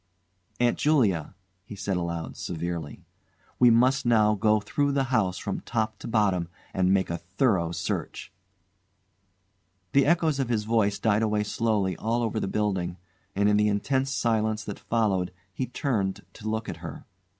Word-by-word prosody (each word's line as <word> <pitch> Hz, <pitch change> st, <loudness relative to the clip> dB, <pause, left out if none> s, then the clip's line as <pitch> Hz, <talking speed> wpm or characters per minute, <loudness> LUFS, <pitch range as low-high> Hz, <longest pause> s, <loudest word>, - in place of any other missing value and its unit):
"Aunt 120 Hz, -1 st, +2 dB
Julia," 105 Hz, -, +2 dB, 0.3 s
he 105 Hz, -, -9 dB
said 100 Hz, -1 st, -2 dB
aloud, 85 Hz, -2 st, -3 dB
severely, 85 Hz, -3 st, -5 dB, 0.5 s
"we 125 Hz, -, +7 dB
must 130 Hz, +4 st, +4 dB
now 110 Hz, -3 st, +4 dB
go 105 Hz, 0 st, +3 dB
through 140 Hz, +7 st, 0 dB
the 135 Hz, -1 st, +2 dB
house 95 Hz, -5 st, +2 dB
from 100 Hz, -, -3 dB
top 110 Hz, -2 st, -2 dB
to -, -, -7 dB
bottom 100 Hz, -7 st, +1 dB, 0.3 s
and 95 Hz, 0 st, +2 dB
make 95 Hz, -2 st, +2 dB
a 85 Hz, -, -3 dB
thorough 90 Hz, -1 st, +1 dB
search." -, -, -4 dB, 1.6 s
The 140 Hz, 0 st, +4 dB
echoes 160 Hz, -3 st, +2 dB
of 130 Hz, -3 st, -1 dB
his 110 Hz, -3 st, +1 dB
voice 105 Hz, -2 st, +1 dB
died 110 Hz, -1 st, +2 dB
away 105 Hz, -1 st, +1 dB
slowly 105 Hz, -4 st, 0 dB
all 115 Hz, +2 st, 0 dB
over 110 Hz, -1 st, -1 dB
the -, -, -2 dB
building, 95 Hz, -4 st, -1 dB, 0.4 s
and 100 Hz, +1 st, +3 dB
in 105 Hz, 0 st, +4 dB
the 105 Hz, 0 st, +3 dB
intense 130 Hz, +6 st, 0 dB
silence 110 Hz, -4 st, 0 dB
that 105 Hz, -, -6 dB
followed 100 Hz, -6 st, 0 dB, 0.2 s
he 130 Hz, -, -3 dB
turned 100 Hz, -8 st, -2 dB
to 110 Hz, -, -6 dB
look 110 Hz, 0 st, -2 dB
at -, -, -5 dB
her. -, -, -8 dB
105 Hz, 160 wpm, -27 LUFS, 95-115 Hz, 1.6 s, we